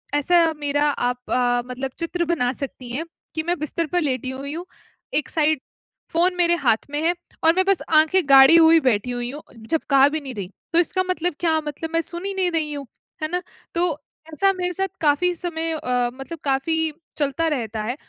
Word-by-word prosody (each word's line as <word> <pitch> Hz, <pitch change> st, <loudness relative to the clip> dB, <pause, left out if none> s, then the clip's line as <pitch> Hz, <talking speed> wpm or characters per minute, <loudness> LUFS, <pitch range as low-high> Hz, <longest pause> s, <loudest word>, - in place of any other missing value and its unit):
ऐसा 330 Hz, +2 st, +3 dB
मेरा 290 Hz, 0 st, 0 dB
आप 245 Hz, -3 st, -1 dB
अ, 245 Hz, -1 st, +2 dB
मतलब 260 Hz, +1 st, -4 dB
चित्र 345 Hz, +1 st, -1 dB
बना 305 Hz, -7 st, 0 dB
सकती 260 Hz, -2 st, -7 dB
हैं, 295 Hz, +7 st, -2 dB, 0.3 s
कि 315 Hz, -, 0 dB
मैं 350 Hz, +2 st, -1 dB
बिस्तर 310 Hz, +3 st, -2 dB
पर 355 Hz, -, +3 dB
लेटी 260 Hz, -4 st, -1 dB
हुई 275 Hz, +2 st, -5 dB
हूँ। 340 Hz, +3 st, -6 dB, 0.5 s
एक 295 Hz, -3 st, +1 dB
साइड 310 Hz, -2 st, +1 dB, 0.5 s
फ़ोन 355 Hz, +2 st, +3 dB
मेरे 345 Hz, -1 st, +4 dB
हाथ 235 Hz, -9 st, +2 dB
में 295 Hz, +1 st, -1 dB
है 340 Hz, +2 st, +3 dB, 0.3 s
और 325 Hz, 0 st, +6 dB
मैं 375 Hz, 0 st, +2 dB
बस 390 Hz, -2 st, +2 dB
आँखें 315 Hz, +4 st, +5 dB
गाड़ी 270 Hz, +3 st, +9 dB
हुई 330 Hz, 0 st, +7 dB
बैठी 250 Hz, -4 st, 0 dB
हुई 245 Hz, 0 st, -3 dB
हूँ, 295 Hz, +2 st, -8 dB, 0.2 s
जब 230 Hz, +9 st, -2 dB
कहा 275 Hz, -1 st, +6 dB
भी 315 Hz, +2 st, -2 dB
नहीं 270 Hz, -2 st, -7 dB
रही। 195 Hz, -3 st, -5 dB, 0.2 s
तो 335 Hz, -, +5 dB
इसका 370 Hz, +2 st, +1 dB
मतलब 355 Hz, -1 st, 0 dB
क्या, 325 Hz, -2 st, +2 dB
मतलब 300 Hz, +2 st, -6 dB
मैं 330 Hz, -, +2 dB
सुन 345 Hz, +3 st, -5 dB
ही 395 Hz, -, -2 dB
नहीं 375 Hz, -2 st, 0 dB
रही 310 Hz, -3 st, 0 dB
हूँ, 285 Hz, -2 st, -6 dB, 0.4 s
है -, -, +1 dB
ना? 360 Hz, 0 st, -1 dB, 0.3 s
तो 345 Hz, 0 st, +2 dB, 0.4 s
ऐसा 390 Hz, +5 st, +3 dB
मेरे 360 Hz, -1 st, -2 dB
साथ 385 Hz, +2 st, -1 dB
काफ़ी 320 Hz, +4 st, +2 dB
समय 330 Hz, -1 st, -3 dB
अ, 250 Hz, -5 st, 0 dB
मतलब 270 Hz, +5 st, -8 dB
काफ़ी 315 Hz, +3 st, 0 dB, 0.2 s
चलता 290 Hz, +2 st, 0 dB
रहता 230 Hz, -8 st, -2 dB
है। 240 Hz, +4 st, -2 dB
310 Hz, 205 wpm, -22 LUFS, 270-340 Hz, 0.5 s, गाड़ी